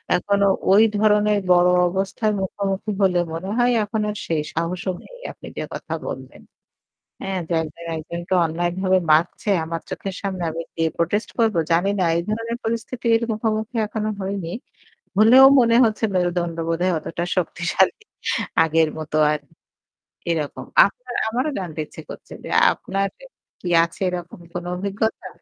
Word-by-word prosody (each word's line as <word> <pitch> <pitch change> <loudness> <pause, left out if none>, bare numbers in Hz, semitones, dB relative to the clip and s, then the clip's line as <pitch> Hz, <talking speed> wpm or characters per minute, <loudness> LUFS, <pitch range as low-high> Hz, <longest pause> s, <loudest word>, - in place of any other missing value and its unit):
এখনো 200 +2 +2 0.2
ওই 205 +3 +7
ধরনের 210 0 +3
বড় 180 0 +6 0.2
অবস্থার 195 +4 -1
মুখোমুখি 195 +2 -2
হলে 185 -2 +3
মনে 170 +4 -5
হয় 245 0 +3
এখন 215 +1 -2
আর 210 - -4
সেই 160 -2 0
সাহসও 175 +3 -2
নেই - - -14
আপনি - - -13
যে - - -2
কথা - - -6 0.2
বললেন - - -9 0.8
হ্যাঁ? 190 -1 -2
যে 170 - -1
একজন 160 +2 -9
একজনকে 170 +3 -4
অন্যায় 170 +2 -1
ভাবে 190 -1 +3
মারছে 165 +6 +2
আমার 165 +1 -4
চোখের 195 -1 -5
সামনে 190 -3 -3
আমি, 165 +1 -4
দিয়ে 165 -1 +1
প্রোটেস্ট 190 +6 0
করব 225 -2 +3 0.2
জানিনা 190 +3 +2
এই 170 - 0
ধরনের 230 +2 -2
পরিস্থিতির 230 0 0
মুখোমুখি 220 +1 -2
এখনো 215 0 -3
হইনি। 190 -3 -3 0.7
হলেও 245 +5 +8
মনে 230 -1 +4
হচ্ছে 220 0 -2
মেরুদন্ড 175 -2 0
বোধহয় 175 +2 +1
অতটা 165 +2 -4
শক্তিশালী। 175 +1 +1 0.7
আগের 160 0 +2
মত 155 -1 -7 0.2
আর 150 - -1 0.9
এরকম। 155 -4 -2 0.2
আপনার 245 +5 -9
আমারও 250 +7 -1
জানতে 170 -5 -5
ইচ্ছে - - -11
করছে - - -11
যে - - -7 0.2
আপনার 195 0 -2 0.5
কি 180 - -5 0.2
আছে 170 - -10
এরকম 175 -1 -6
কোন 175 0 -4
অভিজ্ঞতা? 200 +4 -2
190 Hz, 145 wpm, -22 LUFS, 170-215 Hz, 0.9 s, হলেও